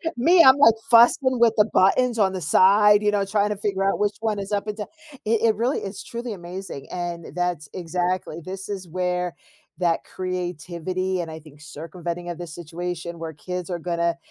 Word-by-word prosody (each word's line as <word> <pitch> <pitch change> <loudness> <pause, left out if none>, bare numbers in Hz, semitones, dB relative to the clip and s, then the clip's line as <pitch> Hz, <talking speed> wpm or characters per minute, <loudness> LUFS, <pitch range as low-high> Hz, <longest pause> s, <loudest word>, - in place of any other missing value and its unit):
Me, 335 +8 +5
I'm 265 0 +8
like 230 -6 +6
fussing 245 +2 +5
with 230 -1 +5
the 210 - +6
buttons 235 +5 +3
on 190 -2 +3
the 185 - -4
side, 205 +5 +5
you 210 - +3
know, 200 -1 0
trying 205 +1 +1
to 210 - -3
figure 195 -2 -1
out 195 - +1
which 205 0 0
one 215 -2 -1
is 195 +1 -6
up 205 +1 0
and 210 0 -4
down. 210 - -5 0.4
It 220 0 +1
it 225 -2 +3
really 245 +5 0
is 195 0 -7
truly 235 0 -6
amazing, 180 -4 -8
and 175 -3 -5
that's 175 -4 -2
exactly 180 -1 -2
this 195 +2 -7
is 190 -3 -5
where 180 0 -2 0.4
that 170 -2 +1
creativity, 180 0 -3
and 165 -1 -6
I 160 - -8
think 150 -1 -17
circumventing 170 +3 -6
of 170 - -5
this 170 -3 -8
situation 170 +1 -6
where 165 -1 -6
kids 180 +4 -6
are 175 -1 -3
gonna 170 0 -1
185 Hz, 195 wpm, -23 LUFS, 175-210 Hz, 0.4 s, I'm